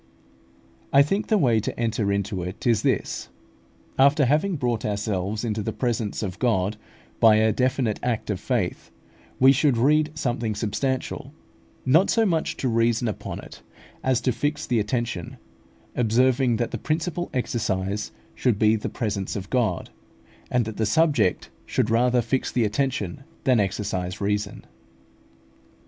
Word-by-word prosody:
I 140 0 +7
think 195 +8 -1
the 215 - +3
way 120 - +3
to 110 - -4
enter 110 -3 0
into 100 -1 -1
it 90 +1 -6
is 115 -4 +3
this: - - -1 0.7
After 140 +1 +5
having 155 +8 +2
brought 120 -6 -1
ourselves 105 0 -2
into 110 -1 -1
the 110 - -2
presence 115 -3 -2
of 95 -4 -5
God 105 -5 +1 0.4
by 110 -2 +7
a 110 +1 +4
definite 125 -1 0
act 115 -3 -1
of 95 - -3
faith, 110 -5 -2 0.5
we 130 +1 +7
should 135 -2 +2
read 150 +5 +3
something 120 -5 -1
substantial, 120 +5 -2 0.5
not 160 +9 +4
so 225 -1 +3
much 165 -5 0
to 130 - -1
reason 115 0 +2
upon 110 - -5
it, - - -13 0.4
as 130 -2 +2
to 130 - +1
fix 145 +5 -2
the 120 -2 +1
attention, 110 -4 -3 0.6
observing 125 +2 +3
that 120 +1 -2
the - - -4
principal 170 +2 -2
exercise 105 -5 -2 0.2
should 120 -5 +1
be 110 +1 +4
the 105 - -3
presence 100 -4 -3
of 100 -1 -6
God, 125 -4 0 0.6
and 125 -2 +1
that 110 -1 -6
the 110 - +1
subject 140 - +2 0.2
should 110 - 0
rather 125 +1 +3
fix 130 +3 -1
the 120 - +1
attention 120 -1 -2 0.2
than 125 -3 +3
exercise 95 -2 -2
reason. 105 0 -2
115 Hz, 150 wpm, -24 LUFS, 105-130 Hz, 0.7 s, I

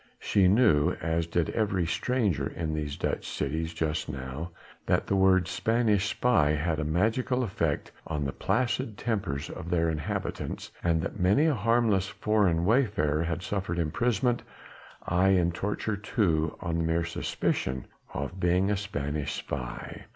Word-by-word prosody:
She 100 -3 +3
knew 95 -8 +4
as 80 +1 -1
did 85 0 0
every 100 -5 0
stranger 110 +2 0
in 80 -2 -3
these 75 -2 -3
Dutch - - -2
cities 80 +3 -2
just 80 -2 -2
now 70 +4 -5 0.4
that - - +2
the 100 - 0
words 95 -2 +4
"Spanish 110 -3 +2
spy" 75 -15 +3
had 80 +1 0
a - - 0
magical 110 - +1
effect 90 -9 -1 0.2
on 75 -1 -2
the 70 - -1
placid 120 - -1
tempers 95 -12 -2
of 85 - -7
their 85 -1 +2
inhabitants, 75 -2 -4
and 80 -2 +2
that - - -5
many 100 - +4
a 160 - +3
harmless 115 -4 +2
foreign 100 -5 +1
wayfarer 100 - +2
had 85 +1 -2
suffered 100 -4 -2
imprisonment, 115 +8 +1 0.7
aye 95 +2 +4
and 85 0 +1
torture 105 +3 -2
too, 85 -7 0
on 85 -2 -1
the - - +1
mere 80 +1 +1
suspicion 65 -5 -2 0.3
of 70 +7 -4
being 90 +3 +2
a 105 - +1
"Spanish 75 -7 -3
spy." 60 -1 -6
90 Hz, 150 wpm, -28 LUFS, 80-105 Hz, 0.7 s, knew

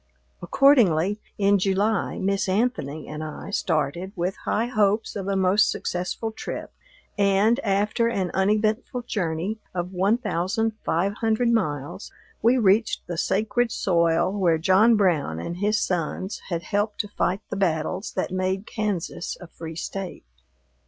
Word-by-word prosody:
Accordingly, 210 - +4 0.2
in 200 0 +3
July, 195 +2 0
Miss 195 0 0
Anthony 185 - -1
and 155 +1 -6
I 155 +5 -7
started, 170 +1 -1
with 180 +1 -1
high 225 - +1
hopes 215 -3 +1
of 195 -2 -4
a 200 - 0
most 190 +2 +4
successful 180 +5 -3
trip, 220 - -6 0.5
and, 200 +5 +3
after 210 +1 +1
an 195 -6 -1
uneventful 215 +5 +1
journey 190 -1 -2 0.2
of 180 +1 -3
one 195 +5 +2
thousand 215 +1 -1
five 185 +5 0
hundred 225 +2 +1
miles, 155 - -1 0.3
we 235 +4 +4
reached 215 0 +2
the 175 - -4
sacred 220 +7 0
soil 170 -1 +2
where 180 -5 +2
John 190 +8 +5
Brown 160 - +1
and 170 - -5
his 210 +2 +1
sons 180 +2 -2
had 170 -2 -2
helped 205 +3 -1
to 210 - -9
fight 195 -1 -1
the - - -1
battles 180 +1 -1
that 185 - -2
made 185 +2 -1
Kansas 205 -7 -3
a 180 - -9
free 165 -1 -9
State. 190 +2 -6
195 Hz, 145 wpm, -24 LUFS, 175-215 Hz, 0.5 s, John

